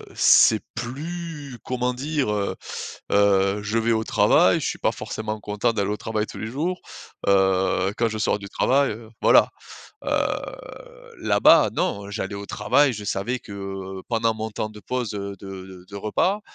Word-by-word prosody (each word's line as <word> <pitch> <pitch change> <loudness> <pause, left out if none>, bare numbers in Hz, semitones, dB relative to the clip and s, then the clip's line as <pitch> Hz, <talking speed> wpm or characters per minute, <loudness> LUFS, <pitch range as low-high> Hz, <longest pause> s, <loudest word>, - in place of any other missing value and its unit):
C'est 110 -1 +6
plus, 145 +2 -6
comment 125 0 -1
dire, 140 0 -1
heu? 100 -1 -1 0.6
Heu, 100 0 +3
je 110 +2 -1
vais 115 +1 +1
au 110 0 +1
travail, - - +4
je - - -3
suis - - -3
pas - - +2
forcément 110 0 -5
content 105 +3 0
d'aller 100 -2 -1
au 105 - -1
travail 110 -1 -2
tous - - -9
les - - -4
jours. 165 +9 -2 0.5
Heu, 95 -1 +3
quand 115 - +2
je 110 - -4
sors 105 - +1
du 100 - -8
travail, 135 +3 +2
heu. 110 +1 -9
Voilà, - - +6 0.6
heu, - - -2 1.1
là-bas - - +5
non, 100 0 -2
j'allais 100 -1 -4
au 100 0 -6
travail, 130 +9 +2
je 105 - -7
savais 105 +5 -1
que, 100 - -12
heu, 95 -1 -6
pendant 115 -1 +1
mon 110 0 -4
temps 105 +1 -4
de 105 0 -12
pause, 125 -2 -3
heu, 100 0 -4
de 100 - -11 0.2
de 90 -1 -12
de 100 - -8
repas. 145 - 0
110 Hz, 180 wpm, -24 LUFS, 100-125 Hz, 1.1 s, C'est